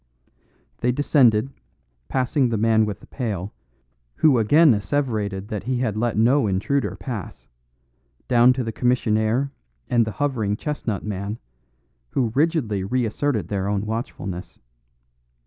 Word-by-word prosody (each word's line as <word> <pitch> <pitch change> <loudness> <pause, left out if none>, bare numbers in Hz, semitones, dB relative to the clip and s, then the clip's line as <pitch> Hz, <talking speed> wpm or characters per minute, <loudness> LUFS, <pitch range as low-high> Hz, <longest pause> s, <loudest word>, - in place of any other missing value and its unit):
They 125 - +1
descended, 130 -3 +3 0.6
passing 130 0 +1
the 115 - 0
man 110 0 +3
with 105 - -5
the - - -14
pail, 105 -6 -4 0.6
who 140 -6 +4
again 145 +6 +5
asseverated 105 -3 -2
that 105 -3 -3
he 130 0 0
had 120 -4 -1
let 115 0 -1
no 120 +2 +4
intruder 105 +5 0
pass, 115 -7 -7 0.8
down 120 0 +5
to 130 0 -2
the 115 - -3
commissionaire 120 +1 +1 0.4
and 120 -1 +4
the 110 -1 -4
hovering 110 -5 -1
chestnut 125 -9 -3
man, 100 +1 -4 0.7
who 120 -5 0
rigidly 140 - +1
reasserted 115 - -1
their 100 -1 -1
own 100 0 -1
watchfulness. 105 -5 -5
115 Hz, 130 wpm, -23 LUFS, 105-130 Hz, 0.8 s, again